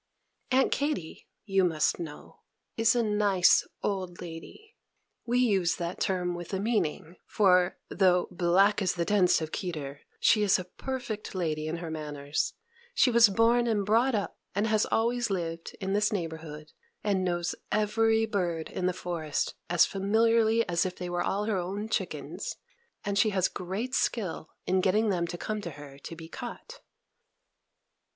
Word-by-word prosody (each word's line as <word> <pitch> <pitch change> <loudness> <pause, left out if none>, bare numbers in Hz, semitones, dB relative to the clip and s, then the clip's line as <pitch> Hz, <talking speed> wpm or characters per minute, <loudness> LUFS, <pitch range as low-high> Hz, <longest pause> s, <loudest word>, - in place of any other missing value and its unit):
Aunt 265 +1 +3
Katy, 285 - -2 0.2
you 195 -2 +2
must 160 -2 +1
know, 160 -4 -9 0.4
is 225 +1 +3
a 240 - +2
nice 205 -4 +3 0.2
old 185 -3 -2
lady. 180 - -10 0.5
We 240 +1 +1
use 200 -8 +2
that 170 0 -4
term 180 -2 0
with 175 +2 -5
a - - -1
meaning; 190 -6 -1
for, 180 -3 +3
though 180 -2 +3
"black 185 +4 +3
as 185 -3 +1
the 170 -1 -1
tents 185 -4 +3
of 155 0 -4
Kedar," 150 -7 -5 0.2
she 215 - +4
is 205 -2 +4
a 185 - -4
perfect 235 0 -5
lady 155 -4 -1
in 160 +2 -2
her 165 -1 -6
manners: 150 -2 -3 0.4
she 265 - +4
was 230 -2 +7
born 230 +4 +3
and 210 -3 +1
brought 230 +4 +3
up, 205 - -3 0.2
and 205 +2 +1
has 215 -1 +2
always 235 +1 +1
lived, 165 -3 -4
in 195 0 -2
this 210 +1 +2
neighborhood, 160 -5 -5 0.3
and 195 -3 +1
knows 175 -1 -1 0.2
every 220 +1 +2
bird 175 -7 -2
in 180 - -1
the 185 - +1
forest 165 -4 -2 0.2
as 175 -1 +5
familiarly 225 +3 +2
as 170 -2 +1
if 185 -1 -3
they 180 -1 -5
were 175 0 -1
all 205 +2 -1
her 215 -3 0
own 195 +4 -4
chickens; 220 - -3 0.5
and 200 0 0
she 215 - +4
has 190 -3 +2
great 195 +8 -4
skill 190 - -1 0.2
in 185 0 +2
getting 210 +4 +2
them 175 -3 0
to 175 - -5
come 215 +3 -3
to 175 - -5
her 145 -2 -11
to 165 - -8
be 165 0 -10
caught. 265 - -8
190 Hz, 165 wpm, -28 LUFS, 170-220 Hz, 0.5 s, was